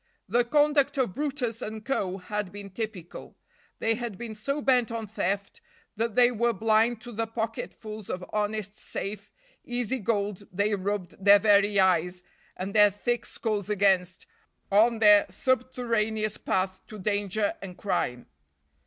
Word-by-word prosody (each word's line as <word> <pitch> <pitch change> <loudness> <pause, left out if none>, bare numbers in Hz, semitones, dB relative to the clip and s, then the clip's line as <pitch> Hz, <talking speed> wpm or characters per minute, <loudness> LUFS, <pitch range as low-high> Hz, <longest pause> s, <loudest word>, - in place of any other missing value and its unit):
The 240 +5 +3
conduct 290 +1 +2
of 250 -8 +1
brutus 260 -5 -2
and 215 -1 -6
co. 195 -9 -1
had 205 0 -4
been 200 0 -9
typical. 195 -4 -7 0.4
They 225 - +1
had 230 -4 -5
been 230 0 -6
so 275 +7 -3
bent 255 -4 +3
on 230 -1 -4
theft, 200 -1 -3 0.3
that 225 0 -2
they 245 0 +6
were 235 0 +1
blind 220 +2 +2
to 240 - -9
the 225 0 -2
pocketfuls 220 -1 -5
of 180 0 -4
honest, 210 -1 -1
safe, 205 -1 -6 0.3
easy 245 +1 -2
gold 205 -2 -2
they 205 +3 +1
rubbed 195 -1 -3
their 200 +1 +8
very 205 -1 +4
eyes 180 -1 +2 0.3
and 190 +2 -4
their 210 -1 +7
thick 240 +4 -2
skulls 210 -4 -3
against 190 -3 +2 0.5
on 225 +4 +5
their 210 -2 +6
subterraneous 230 -4 0
path 185 0 -1
to 215 -3 -9
danger 205 +1 0
and 185 -2 -8
crime. 125 -11 -2
215 Hz, 145 wpm, -27 LUFS, 200-235 Hz, 0.5 s, their